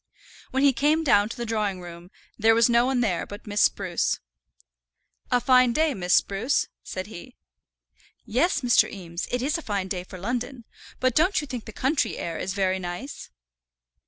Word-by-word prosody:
When 265 +1 0
he 280 -1 +5
came 300 +6 +2
down 205 -7 +4
to 230 - -7
the 240 - -3
drawing 210 -4 -1
room, 175 0 -10 0.3
there 225 +1 +4
was 230 0 +5
no 235 +1 +4
one 260 -2 +1
there 190 -7 0
but 205 +2 -10
Miss 210 -1 0
Spruce. 185 -4 +1 1.1
"A 250 - +3
fine 255 -1 +4
day, 310 +2 +2
Miss 180 -4 +1
Spruce," 220 +8 +1
said 185 0 -5
he. 220 +4 -11 0.9
"Yes, 310 - +1
Mr. 245 -2 +4
Eames, 170 -4 -6
it 245 0 -1
is 305 +5 0
a - - -7
fine 200 -7 -3
day 180 -2 -3
for 185 - -11
London; 240 +4 -4 0.3
but 255 -1 +2
don't 345 - +3
you 300 - -4
think 250 -5 -6
the - - -8
country 270 +7 0
air 165 -1 -4
is 190 +1 -3
very 190 -1 +1
nice?" 180 +10 -6
230 Hz, 185 wpm, -25 LUFS, 190-260 Hz, 1.1 s, he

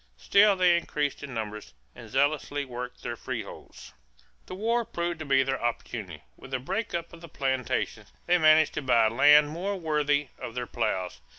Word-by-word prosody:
Still 200 - +4
they 180 -2 +4
increased 150 -4 -2
in 140 - -7
numbers 105 - -6 0.2
and 115 - -12
zealously 145 +2 0
worked 125 -1 -7
their - - -4
freeholds. - - -8 0.5
The 185 - -7
war 230 +4 0
proved 175 -6 -4
to 155 - -5
be 135 -1 +3
their 135 0 -2
opportunity. 120 -1 -4
With 135 - -13
the 130 - -1
break 190 - -3
up 170 0 -5
of 170 - -12
the 170 - -11
plantations, 130 -3 -2
they 180 0 +3
managed 155 -1 +5
to - - -3
buy 115 -5 +3
land 145 +5 +6
more 190 +4 -3
worthy 150 -3 0
of 115 - -7
their 125 -1 -3
plows. 90 - -2
145 Hz, 180 wpm, -27 LUFS, 125-170 Hz, 0.5 s, land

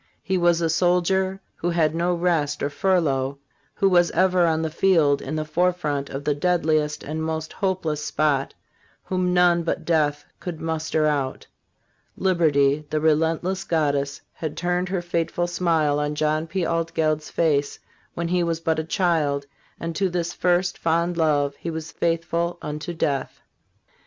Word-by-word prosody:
he 190 - -1
was 175 -1 +3
a 165 - +2
soldier 180 +3 +1 0.2
who 175 - -1
had 165 -3 +2
no 175 +2 +1
rest 165 -4 0
or 145 - -1
furlough, 145 -5 +1 0.4
who 195 - +2
was 175 -2 +4
ever 180 0 +3
on 160 0 +1
the 160 - -1
field 160 -5 +3
in 155 - -4
the 155 0 -2
forefront 155 -3 0
of 135 +1 -5
the 150 - +1
deadliest 155 -1 +1
and 155 +2 -4
most 160 0 -3
hopeless 175 -6 -1
spot, 150 -3 0 0.5
whom 185 -1 -1
none 175 -1 +4
but 165 0 -3
death 150 -3 +1
could 175 -3 -6
muster 160 -1 -1
out. 140 -3 -1 0.7
Liberty, 150 -6 +2
the 155 - 0
relentless 165 +4 +1
goddess, 145 -5 0
had 155 -2 -5
turned 180 +1 -1
her 185 -2 -2
fateful 175 0 -1
smile 165 -4 +1
on 150 0 -1
John 155 +1 0
P. 175 +2 -1
Altgeld's 160 -2 0
face 145 -4 +1 0.4
when 170 0 -2
he 180 0 +2
was 165 -1 -1
but 160 -1 0
a - - -1
child, 160 -5 0 0.3
and 165 0 -4
to 195 +1 +1
this 175 -1 -2
first, 180 0 +1
fond 170 +1 +1
love 145 -3 +1
he 170 - -5
was 160 -1 -5
faithful 170 +1 -1
unto 150 +3 -4
death. 145 -5 -2
165 Hz, 160 wpm, -23 LUFS, 150-175 Hz, 0.7 s, was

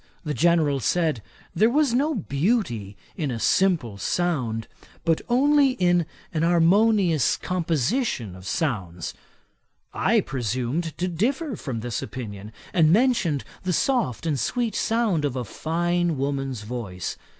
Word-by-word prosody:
The 150 -3 -2
General 160 -4 +3
said, 155 0 +1 0.3
there 220 +2 +4
was 285 -1 +2
no 290 +5 +1
beauty 140 - -1 0.2
in 150 -4 -2
a 120 - -2
simple 155 - +2
sound, 125 - -1 0.4
but 165 -2 +2
only 275 +2 +4
in 175 -7 +2 0.3
an 155 - 0
harmonious 175 - +3
composition 165 - -1
of 95 +1 -10
sounds. 95 - -2 0.8
I - - +3
presumed 130 +6 -2
to 180 - -1
differ 250 - -1
from 125 - -5
this 120 0 -3
opinion, 105 -3 -7 0.2
and 160 -3 +4
mentioned 195 - +2 0.2
the 185 -1 -1
soft 225 - 0
and 150 -4 0
sweet 235 - -1
sound 220 -9 +1
of 140 -3 -1
a 125 -2 -3
fine 175 - -1
woman's 135 -4 -2
voice. 105 -5 -5
165 Hz, 130 wpm, -24 LUFS, 125-195 Hz, 0.8 s, there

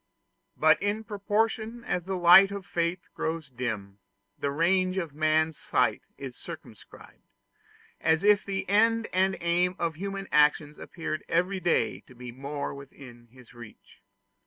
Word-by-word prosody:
But - - +4
in 205 +2 -1
proportion 220 +3 -2
as 180 -7 -2
the 190 0 -3
light 180 +2 +8
of 200 -2 -6
faith 170 +1 -1
grows 160 -3 -4
dim, 110 -6 -5 0.4
the 140 - -2
range 185 +5 +1
of 165 -6 -3
man's 155 +1 +1
sight - - +1 0.2
is - - -8
circumscribed, - - -12 0.8
as 160 +1 +2
if 210 0 +5
the 195 0 -4
end 225 +3 +3
and 190 +1 +2
aim 175 +2 +1
of 165 -1 -1
human 195 +1 -5
actions 150 0 +3
appeared 160 -2 -5
every 180 +3 +1
day 175 -2 +1
to 125 - -16
be 125 0 -8
more 140 +3 -5
within 130 -4 -13
his 125 +1 -18
reach. 110 -4 -14
170 Hz, 145 wpm, -27 LUFS, 140-195 Hz, 0.8 s, light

